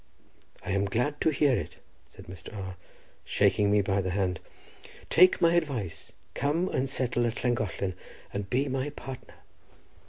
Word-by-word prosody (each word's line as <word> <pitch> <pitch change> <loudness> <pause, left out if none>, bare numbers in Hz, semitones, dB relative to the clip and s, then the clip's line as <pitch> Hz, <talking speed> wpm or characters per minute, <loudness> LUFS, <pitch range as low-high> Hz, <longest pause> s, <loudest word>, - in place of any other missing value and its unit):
"I - - -2
am 100 +1 +2
glad 125 +9 -1
to - - +4
hear 145 -3 +3
it," - - -4 0.3
said - - -14
Mr. 90 +3 -9
R—, 95 -2 -5 0.5
shaking 105 -1 +3
me 105 0 +4
by 100 0 +1
the 95 - -2
hand. 90 -2 0 0.7
"Take 180 +2 +6
my 170 0 +4
advice, 135 - -1 0.2
come 165 +6 0
and 130 +1 -1
settle 125 -2 +1
at 115 - -4
Llangollen, 105 -6 0 0.4
and 100 -1 -4
be 135 +3 +1
my 135 +1 -1
partner." 135 -3 -9
120 Hz, 155 wpm, -28 LUFS, 100-140 Hz, 0.7 s, Take